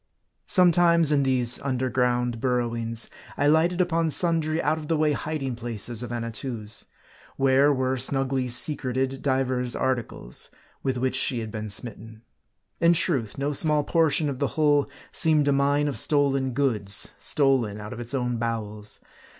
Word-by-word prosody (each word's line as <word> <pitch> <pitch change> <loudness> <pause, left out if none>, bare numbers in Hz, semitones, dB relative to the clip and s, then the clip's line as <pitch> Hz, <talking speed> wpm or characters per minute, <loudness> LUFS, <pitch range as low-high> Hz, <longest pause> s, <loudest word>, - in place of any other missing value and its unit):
Sometimes, 170 -3 +4
in 145 -2 +3
these 125 -3 +2
under 130 -2 -2
ground 125 -1 0
burrowings, 115 -2 -1 0.3
I 145 - +1
lighted 160 +4 +3
upon 165 -2 +1
sundry 160 -1 +1
out 155 +1 0
of 150 - -9
the 160 - 0
way 155 0 +2
hiding 145 -3 -3
places 115 -1 -4
of 120 -1 -6
Annatoo's; 115 -1 -1 0.5
where 135 +1 +4
were 130 -1 0
snugly 130 0 -1
secreted 130 0 -1
divers 130 -2 0
articles, 120 - -3 0.3
with 130 -1 -2
which 130 +1 -1
she 130 -1 +2
had 110 -2 -5
been 110 -1 -5
smitten. 110 +1 -5 0.6
In 170 0 +4
truth, 140 - 0
no 140 +2 -2
small 150 +1 +3
portion 160 -1 +1
of 135 -3 -4
the 140 - +1
hull 145 -2 +3 0.2
seemed 155 -3 +3
a - - +4
mine 140 +1 +1
of 145 - +1
stolen 135 -3 +1
goods, 110 -7 0
stolen 130 -8 +1
out 105 0 -7
of - - -9
its 120 +3 -3
own 125 -2 -1
bowels. 105 -3 -5
130 Hz, 155 wpm, -25 LUFS, 120-145 Hz, 0.6 s, Sometimes